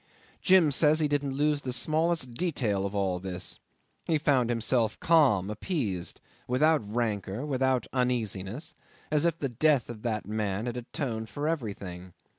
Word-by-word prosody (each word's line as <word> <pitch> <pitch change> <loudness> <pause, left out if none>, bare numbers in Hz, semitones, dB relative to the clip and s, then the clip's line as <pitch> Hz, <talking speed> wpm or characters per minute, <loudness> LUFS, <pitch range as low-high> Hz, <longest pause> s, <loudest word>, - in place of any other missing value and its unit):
Jim 185 -5 +5
says 150 +2 +3
he 155 - +2
didn't 145 -2 -1
lose 145 0 +1
the 130 - -3
smallest 155 0 0
detail 115 - 0
of 100 - -7
all 95 -2 0
this. 90 -1 -5 0.5
He 160 - +2
found 135 -6 +2
himself 115 -1 +1
calm, 140 - +4
appeased, 105 - -3 0.3
without 150 +5 +3
rancour, 110 0 -2
without 130 -3 +1
uneasiness, 120 - -2 0.4
as 150 +1 +2
if 170 -1 +1
the 140 - -1
death 130 0 +2
of 110 -3 -10
that 110 -3 -2
man 105 0 -2
had 120 -1 -3
atoned 120 -2 -4
for 145 +1 -3
everything. 100 - -4
125 Hz, 150 wpm, -28 LUFS, 105-150 Hz, 0.5 s, Jim